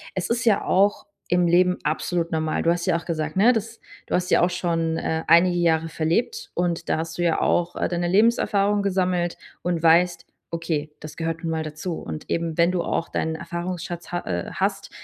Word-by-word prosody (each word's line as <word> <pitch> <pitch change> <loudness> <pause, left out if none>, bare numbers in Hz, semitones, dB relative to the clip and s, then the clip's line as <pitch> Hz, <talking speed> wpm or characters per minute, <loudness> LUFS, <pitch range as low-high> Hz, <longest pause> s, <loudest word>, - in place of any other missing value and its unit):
es 185 - -2
ist 235 +1 0
ja 220 -4 +3
auch 200 +2 +2 0.2
im 180 0 +3
Leben 180 +1 +3
absolut 175 -1 -1
normal. 160 -1 0
Du - - +2
hast 170 0 -1
ja 180 -3 +2
auch 170 - -9
gesagt, 155 -2 -3
ne, 225 +5 +6
dass 225 0 -4 0.3
du - - -5
hast 180 0 -1
ja - - +5
auch 175 - +3
schon, 165 -2 -1
äh, 160 0 -2
einige 175 +2 +5
Jahre 165 -1 +2
verlebt 200 - -1
und 175 -1 -1
da - - +2
hast 165 0 -5
du 175 - -1
ja 170 -1 +1
auch, 175 0 +1
äh, - - 0
deine 175 0 -1
Lebenserfahrung 205 0 +3
gesammelt 185 -3 0 0.2
und 170 -1 -2
weißt: 170 +1 +4 0.3
„Okay, 160 -3 -2
das 155 0 -9
gehört 165 +1 -3
nun 165 - -1
mal 160 0 -1
dazu“. 155 +3 -5
Und 80 -1 -7
eben, 165 -1 -1
wenn 170 +1 +4
du 180 -2 0
auch 165 - -2
deinen 160 0 -2
Erfahrungsschatz 175 +1 -5
ha 175 0 -2
äh, 85 -1 -3
hast, - - -1
175 Hz, 210 wpm, -24 LUFS, 165-180 Hz, 0.3 s, ne